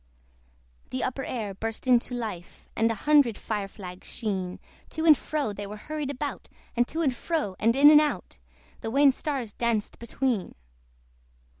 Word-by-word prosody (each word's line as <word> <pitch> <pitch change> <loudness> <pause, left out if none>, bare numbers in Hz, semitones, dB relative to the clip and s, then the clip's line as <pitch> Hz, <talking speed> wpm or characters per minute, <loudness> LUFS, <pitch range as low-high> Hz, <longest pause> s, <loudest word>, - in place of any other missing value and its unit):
The 130 - -3
upper 270 +1 -2
air 220 -7 -4
burst 225 +5 -5
into 245 0 +3
life! 210 -8 -6
And 225 +1 +3
a 225 - 0
hundred 285 -7 +5
fire 205 -3 -3
flags 185 -2 -10
sheen, 190 -5 -3 0.3
To 320 0 -3
and 310 -2 +9
fro 290 -7 -2
they 200 0 -6
were 210 +1 -7
hurried 300 +4 -4
about! 285 +1 -5 0.3
And 240 0 +2
to 330 +1 -2
and 270 -4 +2
fro, 300 - -2
and 230 +2 +3
in 290 +2 +8
and 300 0 +8
out, 285 - -3 0.4
The - - -4
wan 275 +3 +5
stars 260 -6 -3
danced 230 -3 -1
between. 235 -3 -2
235 Hz, 165 wpm, -27 LUFS, 210-285 Hz, 0.4 s, and